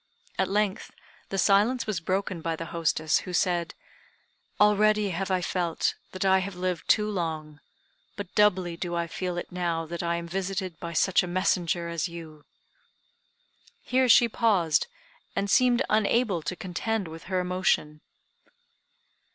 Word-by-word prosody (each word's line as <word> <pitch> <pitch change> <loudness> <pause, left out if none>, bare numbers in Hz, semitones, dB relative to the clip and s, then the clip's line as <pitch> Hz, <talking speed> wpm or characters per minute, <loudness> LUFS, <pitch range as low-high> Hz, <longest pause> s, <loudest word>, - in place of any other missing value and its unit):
At 190 -1 +1
length 205 +1 0 0.4
the 195 - -3
silence 210 +6 +3
was 215 -6 -2
broken 185 0 -2
by 165 0 -2
the 165 - -6
hostess, 160 -1 +1
who 180 - -8
said: 175 -2 0 0.8
"Already 210 0 +4
have 190 +3 -3
I 185 -1 +1
felt 175 -2 0 0.2
that 185 +1 -3
I 190 0 +5
have 190 0 -5
lived 180 -2 -3
too 210 -1 +4
long, 160 -6 -4 0.6
but 200 -3 -7
doubly 185 -5 +3
do 175 0 -4
I 170 0 0
feel 180 +1 -4
it 175 - -5
now 170 -2 -2
that 170 +1 -5
I 170 0 0
am 170 0 -5
visited 190 -1 -3
by 170 -1 -6
such 190 +3 +3
a 180 - -4
messenger 175 -1 0
as 170 +1 -2
you." 160 -3 -10 1.4
Here 255 0 +2
she 240 +1 +7
paused, 190 -10 +2 0.5
and 200 0 -1
seemed 250 +2 +4
unable 215 -3 +2
to 170 +4 -4
contend 195 +3 -3
with 160 0 -10
her 185 0 -1
emotion. 180 -4 0
180 Hz, 150 wpm, -27 LUFS, 170-200 Hz, 1.4 s, she